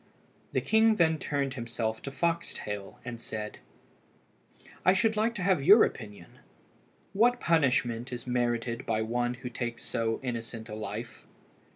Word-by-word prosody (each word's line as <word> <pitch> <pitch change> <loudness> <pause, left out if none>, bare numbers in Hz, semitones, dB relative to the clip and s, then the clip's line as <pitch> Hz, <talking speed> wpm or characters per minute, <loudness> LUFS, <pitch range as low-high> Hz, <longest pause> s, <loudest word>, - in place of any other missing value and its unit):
The - - +2
king 220 0 +4
then 160 -4 +3
turned 140 -2 -1
himself 115 -3 -3
to - - -5
Foxtail, 135 -10 -3
and 120 -2 -6
said 105 -2 -5 1.2
"I 185 - +6
should 220 +3 +2
like 225 +2 +1
to 190 - -3
have 185 -5 +3
your 205 +10 +8
opinion; 105 -6 -5 0.7
what 245 +4 +4
punishment 130 -6 +1
is 120 -1 -6
merited 120 -1 -1
by 110 -1 +1
one 120 +2 -1
who 125 0 -7
takes 120 -1 -4
so 115 -1 -1
innocent 115 -2 -5
a - - -6
life?" 110 +2 -6
120 Hz, 145 wpm, -29 LUFS, 115-165 Hz, 1.2 s, your